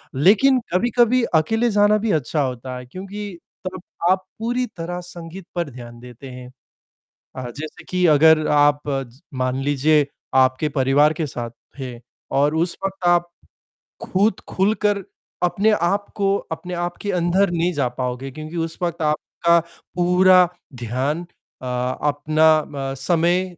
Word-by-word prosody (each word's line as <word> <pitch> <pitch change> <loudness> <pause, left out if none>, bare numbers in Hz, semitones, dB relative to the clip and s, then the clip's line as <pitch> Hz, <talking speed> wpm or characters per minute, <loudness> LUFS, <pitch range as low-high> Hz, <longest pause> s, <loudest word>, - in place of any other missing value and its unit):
लेकिन 210 - +5
कभी-कभी 240 +4 +3
अकेले 225 +9 +2
जाना 205 +1 +4
भी 215 0 -1
अच्छा 150 0 0
होता 130 -1 -4
है 125 - -9
क्योंकि 195 +6 -7 0.3
तब 185 0 -5 0.3
आप 185 0 +1
पूरी 240 +3 -1
तरह 175 +1 -4
संगीत 175 +1 -9
पर 170 -3 -1
ध्यान 120 -2 -11
देते 125 +2 -11
हैं 125 0 -9 0.9
अ, 125 -1 -5
जैसे 150 +5 -9
कि 180 -1 0
अगर 155 0 +5
आप 145 0 +4 0.5
मान 130 0 -1
लीजिए 145 +1 +3 0.3
आपके 130 +3 +3
परिवार 140 +3 +4
के 155 0 -2
साथ 120 -3 -5 0.3
थे 125 -3 -6 0.4
और 145 +2 +3
उस 170 +2 +1
वक़्त 195 -2 -3
आप 175 0 +3 0.7
खुद 195 +1 +1
खुलकर 205 +1 +1 0.4
अपने 195 +5 +2
आप 200 +1 +1
को 195 -1 +2 0.2
अपने 180 +2 -5
आप 175 0 -3
के 205 - -2
अंदर 180 +2 +2
नहीं 175 +1 0
जा 140 -6 0
पाओगे 125 +1 -3
क्योंकि 155 +4 -8
उस 165 -1 -3
वक़्त 170 -1 -2
आपका 165 +2 +2 0.4
पूरा 180 0 +5 0.3
ध्यान, 130 +8 -2 0.4
अ, - - -6 0.4
अपना 155 +2 +2 0.2
म 135 -2 -4
समय 175 +5 +2
165 Hz, 145 wpm, -21 LUFS, 140-185 Hz, 0.9 s, लेकिन